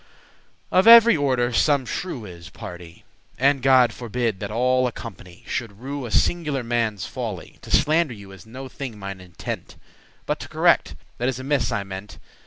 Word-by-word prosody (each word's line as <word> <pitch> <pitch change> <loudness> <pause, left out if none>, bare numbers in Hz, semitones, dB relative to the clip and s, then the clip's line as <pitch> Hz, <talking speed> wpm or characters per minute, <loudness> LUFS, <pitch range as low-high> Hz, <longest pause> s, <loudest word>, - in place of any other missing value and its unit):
Of 185 +4 +4
every 235 0 +9
order 130 -5 +1
some 140 +2 +2
shrew 125 -2 -5
is, 85 -3 -11
pardie; 85 -1 -10 0.3
And 135 +1 +3
God 130 -3 +5
forbid 120 -3 -2
that 100 -1 -5
all 125 +3 +2
a - - -3
company 100 -6 -11
Should 110 -5 -4
rue 135 0 -5
a - - -8
singular* 150 -2 +1
manne's 115 -5 -1
folly. - - -5
*individual - - -16
To - - +7
slander 155 -2 +1
you 100 -2 -12
is 95 -2 -13
no 130 +4 -8
thing 130 -3 -7
mine 100 -2 -7
intent; 90 -2 -7 0.5
But - - -2
to - - -8
correct - - +2 0.2
that 125 +2 +1
is 130 - -3
amiss 135 +2 0
I 100 - -1
meant. 95 +1 -9
120 Hz, 180 wpm, -23 LUFS, 100-135 Hz, 0.5 s, every